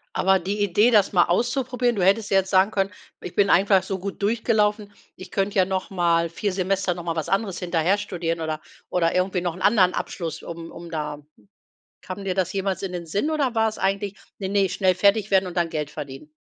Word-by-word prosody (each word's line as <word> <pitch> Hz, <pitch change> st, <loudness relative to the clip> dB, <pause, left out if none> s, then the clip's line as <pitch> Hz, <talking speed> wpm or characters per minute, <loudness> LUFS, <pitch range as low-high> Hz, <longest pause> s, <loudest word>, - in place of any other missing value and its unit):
Aber 190 Hz, 0 st, +3 dB
die 205 Hz, +3 st, -3 dB
Idee, 205 Hz, +5 st, +3 dB
das 210 Hz, -4 st, +4 dB
mal 175 Hz, -2 st, +5 dB
auszuprobieren 245 Hz, +4 st, 0 dB
du 190 Hz, -, 0 dB
hättest 200 Hz, +3 st, +2 dB
jetzt 195 Hz, -1 st, +3 dB
sagen 190 Hz, +2 st, +4 dB
können: 195 Hz, -2 st, 0 dB, 0.3 s
„Ich -, -, -8 dB
bin 200 Hz, -1 st, +3 dB
einfach 195 Hz, 0 st, +4 dB
so 190 Hz, 0 st, -4 dB
gut 195 Hz, +2 st, -6 dB
durchgelaufen, 210 Hz, -1 st, +1 dB, 0.2 s
ich 185 Hz, 0 st, -11 dB
könnte 200 Hz, +1 st, -1 dB
ja 185 Hz, -, +5 dB
noch 190 Hz, +2 st, -3 dB
mal 170 Hz, -3 st, +1 dB
4 200 Hz, +5 st, -2 dB
Semester 190 Hz, 0 st, 0 dB
noch 175 Hz, 0 st, -8 dB
mal 165 Hz, -1 st, -2 dB
was 160 Hz, -2 st, -3 dB
anderes 195 Hz, -2 st, -1 dB
hinterher 175 Hz, +2 st, +1 dB
studieren 170 Hz, -5 st, -3 dB
oder 155 Hz, -1 st, -3 dB, 0.3 s
oder 170 Hz, -1 st, +1 dB
irgendwie 185 Hz, 0 st, +1 dB
noch 175 Hz, -2 st, -2 dB
'n 185 Hz, -, -11 dB
anderen 195 Hz, -4 st, +4 dB
Abschluss, 165 Hz, -3 st, -4 dB
um 165 Hz, 0 st, -8 dB
um 170 Hz, -, -10 dB
da“ 150 Hz, -2 st, -4 dB, 0.8 s
Kam 190 Hz, +1 st, -7 dB
dir 185 Hz, -2 st, -1 dB
das 185 Hz, -2 st, 0 dB
jemals 195 Hz, -1 st, -2 dB
in 190 Hz, -, -3 dB
den 175 Hz, -1 st, -5 dB
Sinn 205 Hz, -, -1 dB
oder 280 Hz, -6 st, 0 dB
war 225 Hz, 0 st, +3 dB
es 215 Hz, -, -10 dB
eigentlich: 200 Hz, +1 st, -1 dB, 0.2 s
„Ne, 190 Hz, -2 st, -3 dB
ne, 195 Hz, -1 st, +2 dB
schnell 185 Hz, 0 st, +2 dB
fertig 205 Hz, +2 st, +2 dB
werden 190 Hz, -1 st, +3 dB
und 175 Hz, -, -8 dB
dann 170 Hz, -1 st, +1 dB
Geld 150 Hz, -2 st, -3 dB
verdienen?“ 150 Hz, 0 st, -9 dB
190 Hz, 220 wpm, -24 LUFS, 175-205 Hz, 0.8 s, mal